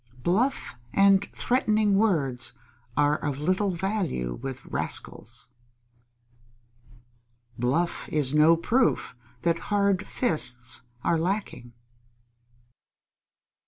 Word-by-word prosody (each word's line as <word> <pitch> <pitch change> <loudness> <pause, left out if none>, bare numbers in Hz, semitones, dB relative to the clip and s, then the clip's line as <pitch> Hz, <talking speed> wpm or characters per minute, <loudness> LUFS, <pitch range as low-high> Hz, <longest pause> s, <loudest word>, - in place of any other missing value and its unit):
Bluff 225 +10 0 0.2
and 195 0 +4
threatening 215 -5 +1
words 135 - +1 0.4
are 145 +1 +3
of 145 -3 -3
little 185 +7 0
value 175 - -2
with 135 -1 -7
rascals. 115 +1 -4 2.1
_Bluff 145 +9 -1
is 145 -3 +3
no 155 +2 +5
proof 230 - 0 0.3
that 170 -1 +1
hard 200 -2 +1
fists 125 - +1 0.2
are 165 - +1
lacking. 175 - -3
170 Hz, 85 wpm, -26 LUFS, 135-200 Hz, 2.1 s, no